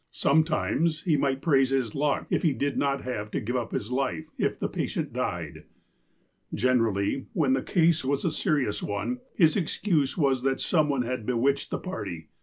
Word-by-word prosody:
Sometimes 160 Hz, +1 st, +1 dB
he 165 Hz, -4 st, +2 dB
might 135 Hz, -1 st, 0 dB
praise 135 Hz, -5 st, +4 dB
his 130 Hz, -5 st, 0 dB
luck 145 Hz, 0 st, 0 dB
if -, -, +2 dB
he 160 Hz, -5 st, +2 dB
did 140 Hz, +1 st, -1 dB
not 140 Hz, -1 st, 0 dB
have 105 Hz, -4 st, -4 dB
to -, -, -2 dB
give 120 Hz, +4 st, -3 dB
up 120 Hz, -2 st, -2 dB
his 110 Hz, +4 st, -3 dB
life, 135 Hz, +4 st, -1 dB
if -, -, -1 dB
the -, -, 0 dB
patient -, -, -3 dB
died. -, -, -4 dB, 0.9 s
Generally, 115 Hz, -1 st, +1 dB
when 140 Hz, -5 st, +2 dB
the 135 Hz, -, +1 dB
case 165 Hz, -1 st, +2 dB
was 140 Hz, +1 st, -1 dB
a 170 Hz, -, +2 dB
serious 150 Hz, -, 0 dB
one, 105 Hz, +5 st, -3 dB, 0.2 s
his 160 Hz, -5 st, +4 dB
excuse 165 Hz, -5 st, 0 dB
was 135 Hz, -5 st, +2 dB
that 135 Hz, 0 st, 0 dB
some 155 Hz, -4 st, +2 dB
one 135 Hz, -3 st, +1 dB
had 120 Hz, -2 st, -4 dB
bewitched 130 Hz, +3 st, +1 dB
the -, -, -2 dB
party. 85 Hz, -, -6 dB
135 Hz, 185 wpm, -27 LUFS, 125-155 Hz, 0.9 s, praise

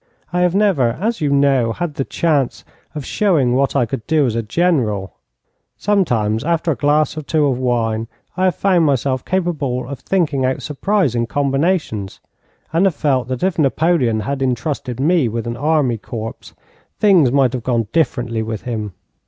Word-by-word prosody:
I 180 Hz, -, +1 dB
have 180 Hz, 0 st, +2 dB
never, 180 Hz, -, +2 dB
as 225 Hz, +2 st, -1 dB
you 150 Hz, -, +1 dB
know, 135 Hz, -5 st, +2 dB
had 175 Hz, +1 st, -3 dB
the 135 Hz, -, -2 dB
chance 145 Hz, -4 st, -1 dB, 0.3 s
of 150 Hz, -3 st, -5 dB
showing 155 Hz, -12 st, +2 dB
what 135 Hz, +2 st, +1 dB
I 130 Hz, -4 st, +3 dB
could 110 Hz, -1 st, -6 dB
do 155 Hz, -3 st, +3 dB
as 120 Hz, -, 0 dB
a 115 Hz, -, -1 dB
general. 110 Hz, -, 0 dB, 0.6 s
Sometimes, 120 Hz, -, +1 dB
after 170 Hz, +1 st, 0 dB
a -, -, 0 dB
glass 150 Hz, +1 st, +1 dB
or 155 Hz, -, -4 dB
two 150 Hz, +1 st, +1 dB
of 130 Hz, -3 st, 0 dB
wine, 115 Hz, -3 st, 0 dB, 0.3 s
I 185 Hz, -, +1 dB
have 185 Hz, -4 st, +2 dB
found 185 Hz, -4 st, +2 dB
myself 130 Hz, -1 st, 0 dB
capable 155 Hz, -10 st, -1 dB
of 140 Hz, -1 st, -6 dB
thinking 150 Hz, -2 st, 0 dB
out 130 Hz, 0 st, -1 dB
surprising 150 Hz, -, 0 dB
combinations, 140 Hz, -, -1 dB, 0.5 s
and 170 Hz, +4 st, +3 dB
have 180 Hz, -, -1 dB
felt 130 Hz, -5 st, 0 dB
that 130 Hz, +3 st, -4 dB
if 185 Hz, -2 st, 0 dB
Napoleon 140 Hz, -6 st, +2 dB
had 135 Hz, +4 st, -3 dB
intrusted 130 Hz, -1 st, -2 dB
me 155 Hz, -1 st, +3 dB
with 115 Hz, +1 st, -4 dB
an 120 Hz, 0 st, -3 dB
army 140 Hz, -3 st, +1 dB
corps, 115 Hz, 0 st, -7 dB, 0.5 s
things 180 Hz, -, +4 dB
might 135 Hz, -2 st, +3 dB
have 125 Hz, -, -3 dB
gone 115 Hz, -2 st, 0 dB
differently 120 Hz, -8 st, 0 dB
with 110 Hz, -1 st, -4 dB
him. 110 Hz, -5 st, -4 dB
135 Hz, 175 wpm, -18 LUFS, 120-165 Hz, 0.6 s, things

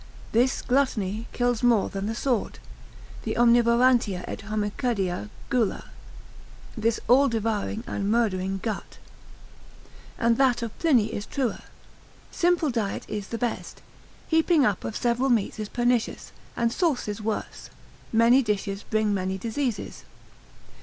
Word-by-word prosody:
This 245 Hz, +4 st, +2 dB
gluttony 230 Hz, -5 st, 0 dB
kills 245 Hz, -2 st, 0 dB
more 235 Hz, -5 st, +3 dB
than 195 Hz, +1 st, -4 dB
the 225 Hz, -, -2 dB
sword, 245 Hz, -2 st, -1 dB, 0.6 s
this -, -, -3 dB
omnivorantia 235 Hz, -4 st, +4 dB
et -, -, -5 dB
homicida 205 Hz, -, -2 dB, 0.2 s
gula, 240 Hz, -6 st, 0 dB, 0.8 s
this 225 Hz, -1 st, 0 dB
all 270 Hz, +3 st, +6 dB
devouring 225 Hz, -1 st, -2 dB
and 200 Hz, 0 st, -2 dB
murdering 195 Hz, -4 st, +1 dB
gut. 220 Hz, -4 st, -4 dB, 1.2 s
And 230 Hz, -1 st, +2 dB
that 255 Hz, -3 st, +3 dB
of 225 Hz, -2 st, -5 dB
Pliny 245 Hz, -10 st, +3 dB
is 205 Hz, -, -4 dB
truer, 260 Hz, -5 st, -2 dB, 0.7 s
Simple 345 Hz, -4 st, +2 dB
diet 220 Hz, -5 st, -2 dB
is 205 Hz, -2 st, -4 dB
the 230 Hz, -, -4 dB
best; 240 Hz, 0 st, -4 dB, 0.4 s
heaping 320 Hz, -2 st, +3 dB
up 205 Hz, -4 st, 0 dB
of 220 Hz, -, -4 dB
several 245 Hz, +2 st, +1 dB
meats 225 Hz, -3 st, +1 dB
is 210 Hz, -1 st, -4 dB
pernicious, 240 Hz, -1 st, 0 dB, 0.3 s
and 235 Hz, -1 st, +1 dB
sauces 250 Hz, -, -1 dB
worse; 215 Hz, 0 st, -4 dB, 0.4 s
many 230 Hz, +4 st, +5 dB
dishes 205 Hz, -3 st, -2 dB
bring 215 Hz, -1 st, 0 dB
many 190 Hz, 0 st, -1 dB
diseases. 230 Hz, +2 st, -3 dB
230 Hz, 125 wpm, -26 LUFS, 210-245 Hz, 1.2 s, all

